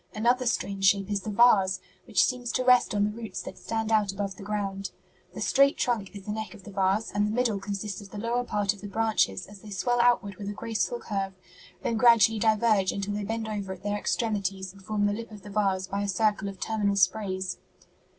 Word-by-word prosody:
Another 245 +3 +2
strange 195 -3 -1
shape 195 +1 +3
is 200 -1 0
the 215 - -5
vase, 200 -4 +4 0.3
which - - +3
seems 245 -2 -1
to 255 - +1
rest 250 -3 +4
on 205 - +2
the 210 - +1
roots 220 -3 -6
that - - -8
stand 225 0 -2
out 210 -3 +3
above 195 0 -4
the - - -12
ground. 195 -1 -3 0.5
'The - - -6
straight 275 +1 +4
trunk 225 -6 0
is 195 -1 -9
the 210 - -3
neck 215 -3 -5
of 195 - -14
the 205 - -10
vase, 195 +2 +1
and 205 +1 +1
the - - -2
middle 230 -3 +1
consists 200 0 -4
of 200 - -12
the 210 - -9
lower 235 +3 -1
part 205 -4 0
of 200 - -15
the 205 - -6
branches 215 - +1
as 205 0 -13
they 210 - -12
swell 240 +5 +1
outward 235 -5 +2
with 200 -1 -5
a - - -4
graceful 230 - -2
curve, 195 - -3 0.5
then 230 - 0
gradually 225 -2 +5
diverge 215 -3 +3
until 200 +1 -3
they 205 0 -2
bend 225 +2 -3
over 200 -3 -4
at 185 +1 -14
their 205 0 -1
extremities 195 -4 -2
and 195 - -16
form 205 +1 0
the 205 - +2
lip 230 +2 -6
of 210 -3 -11
the 205 - -9
vase 195 -2 +1
by 200 +1 -3
a 205 - -1
circle 200 0 +1
of 195 -1 -10
terminal 205 -2 0
sprays.'" 190 -1 0
205 Hz, 230 wpm, -27 LUFS, 195-225 Hz, 0.5 s, gradually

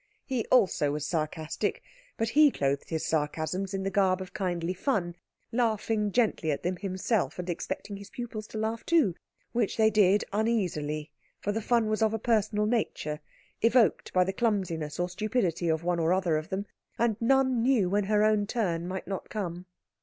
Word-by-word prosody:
He 255 -5 -2
also 185 - +3
was 150 0 -3
sarcastic, 155 0 -2 0.3
but 225 - 0
he 300 +5 +6
clothed 140 - -1
his 160 -1 -2
sarcasms 160 +5 -1
in 195 -1 -2
the 195 - -1
garb 190 -2 +3
of 190 -1 -8
kindly 175 -2 -1
fun, 185 -4 -1 0.4
laughing 220 -3 0
gently 215 -8 +1
at 145 - -1
them 180 +1 -1
himself, 195 +2 -1
and 180 0 -5
expecting 200 +3 -4
his 200 0 -11
pupils 225 -3 -6
to - - -7
laugh 220 +1 -2
too; 315 - +3 0.4
which 230 -4 0
they 220 -1 +4
did 205 -1 +4
uneasily, 165 -9 -1 0.3
for 205 - -1
the 225 +2 -2
fun 235 0 +2
was 215 +1 0
of 220 0 +3
a - - 0
personal 215 -2 +1
nature, 210 -9 -1 0.4
evoked 230 -1 +3
by 185 - +4
the 190 +1 -2
clumsiness 180 -9 -1
or 175 - +1
stupidity 180 -3 -1
of 160 0 0
one 175 0 0
or 165 +2 +3
other 185 -4 +1
of 155 +1 -3
them, 195 +2 -2 0.3
and 235 -2 +2
none 260 0 +3
knew 235 -6 +3
when 200 +2 +1
her 210 +1 +3
own 215 -1 +3
turn 175 -8 -1
might 190 +1 -4
not 195 -1 -5
come. 180 -4 -4
195 Hz, 185 wpm, -28 LUFS, 175-220 Hz, 0.4 s, he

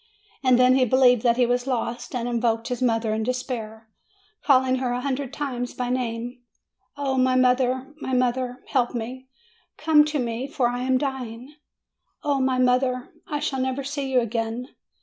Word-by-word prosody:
And 255 -2 +5
then 255 0 +5
he 260 - +4
believed 250 -1 +4
that 235 0 +2
he 250 - +4
was 245 +1 0
lost, 245 -1 -3
and 240 -1 -2
invoked 230 -1 0
his 250 -1 -3
mother 225 -3 +1
in 220 - -1
despair, 225 -2 -4 0.6
calling 260 -2 +4
her 255 -1 -1
a 245 - -2
hundred 270 -1 -2
times 255 -4 -4
by 250 -1 -2
name: 245 0 -3 0.6
"O 270 -2 0
my 255 0 +3
mother! 255 +2 +2
my 260 - -4
mother! 250 0 0
Help 250 -3 +1
me! 250 +3 -5 0.5
Come 305 -1 +5
to 300 0 -2
me, 240 0 -2
for 260 -4 0
I 245 0 -3
am 260 0 +2
dying! 255 -1 -5 0.7
Oh, 285 -2 +1
my 260 -1 +1
poor 255 - +4
mother, 250 0 +1 0.2
I 295 - -2
shall 270 -2 -2
never 260 +1 -2
see 280 -1 -3
you 255 -1 +4
again! 230 +2 -3
255 Hz, 180 wpm, -24 LUFS, 240-265 Hz, 0.7 s, And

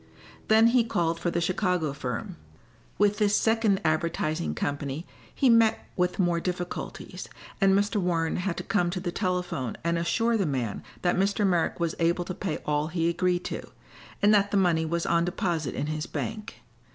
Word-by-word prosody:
Then 220 +1 +6
he 245 0 +4
called 170 -6 -1
for 175 - -1
the 170 - -1
Chicago 180 -3 0
firm. 125 -5 -4 0.6
With 205 0 +2
this 210 -1 +3
second 220 -3 +2
advertising 155 - 0
company 145 - -3 0.3
he 270 - +1
met 230 -2 +4
with 180 0 0
more 175 -3 +2
difficulties, 180 0 -5 0.3
and 195 0 +5
Mr. 205 +2 +1
Warren 170 -4 0
had 180 -1 -2
to - - -3
come 180 -5 +1
to 180 +1 -3
the 175 -1 -3
telephone 180 - -2
and 170 0 +1
assure 230 +7 +1
the 195 -5 0
man 125 -7 -2 0.2
that 175 - +2
Mr. 200 +2 +2
Merrick 175 -3 +1
was 170 -1 0
able 170 +1 +1
to 185 - -4
pay 185 -3 -3
all 150 0 0
he 165 0 0
agreed 175 +1 0
to, - - -3 0.6
and 210 +1 +6
that 200 -1 +4
the 200 - +1
money 170 -4 +2
was 170 +1 -1
on 170 0 +2
deposit 170 - -2
in - - -2
his 155 +1 -3
bank. 215 -1 -5
175 Hz, 180 wpm, -27 LUFS, 165-200 Hz, 0.6 s, Then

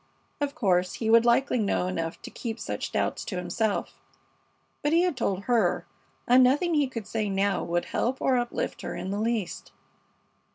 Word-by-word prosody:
Of 285 -1 -2
course, 180 -4 +1
he 225 -1 0
would 230 +1 +6
likely 245 +1 +3
know 200 -4 +1
enough 165 -3 -3
to - - -8
keep 230 -1 -5
such - - -4
doubts - - -1
to 195 - -4
himself; 180 +4 -2 0.8
but 295 +1 +1
he 340 +1 +5
had 360 -5 +1
told 200 -6 -1
her, 210 -8 +1 0.4
and 250 +1 +7
nothing 295 +7 +3
he 295 -3 +3
could 230 -5 -6
say 215 0 -2
now 195 0 +1
would 175 0 -1
help 255 +3 -1
or 265 - +2
uplift 240 -1 -2
her - - -5
in 190 - -4
the 200 - -2
least. 220 -3 -2
225 Hz, 180 wpm, -27 LUFS, 195-255 Hz, 0.8 s, and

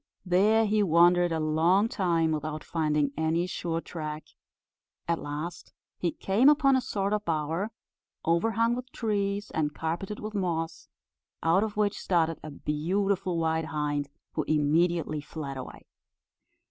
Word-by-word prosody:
There 210 +5 +4
he 210 0 +2
wandered 175 -1 +4
a 160 - 0
long 165 +7 +3
time 170 -7 +1
without 155 0 -3
finding 150 -3 0
any 160 +2 +1
sure 170 -2 -3
track: 155 -2 -6 0.8
at 170 -1 +1
last 155 +4 -6 0.3
he 175 - 0
came 215 - +3
upon 285 -2 +4
a 260 - +2
sort 200 -3 -1
of 210 -1 0
bower, 165 +4 -1 0.6
overhung 225 +8 +2
with 250 +1 -5
trees, 205 -2 -1
and 150 -1 -1
carpeted 170 +6 -3
with 215 0 -6
moss, 170 -5 -2 0.5
out 170 +5 +4
of 210 -1 -4
which 210 -1 +1
started 165 -3 +1
a 155 - -7
beautiful 180 +5 -1
white 160 -1 0
hind, 145 -2 -2 0.2
who - - -1
immediately 155 +1 +1
fled 145 -2 -6
away. 130 -1 -8
170 Hz, 140 wpm, -28 LUFS, 155-200 Hz, 0.8 s, There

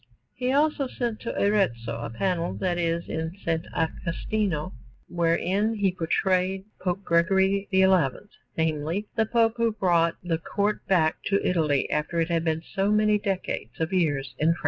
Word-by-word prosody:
He 250 0 -1
also 290 0 +2
sent 240 -3 -3
to 235 - -4
Arezzo 120 - +1
a 115 - -4
panel 175 +8 -1
that 180 -2 -1
is 170 0 -1
in 160 +2 -3
S. 165 -1 +1
Agostino, 170 +1 -2 0.3
wherein 180 +6 +1
he 200 -3 +1
portrayed 185 +2 0
Pope 185 +1 -2
Gregory 190 +4 +2
XI 190 -1 +4 0.7
namely, 160 +4 -1
the 220 -1 +2
Pope 230 0 +2
who 230 -1 +1
brought 170 -5 +2
the 165 -2 -1
Court 205 +4 -1
back 160 -4 +3
to 200 0 +1
Italy 155 -6 +1
after 150 +3 -1
it 165 +1 +1
had 165 -1 +1
been 160 0 -1
so 195 +4 -1
many 210 0 +3
decades 190 - -3
of 160 +3 -1
years 145 -7 0
in 160 +2 +4
France. - - -12
180 Hz, 160 wpm, -26 LUFS, 165-205 Hz, 0.7 s, XI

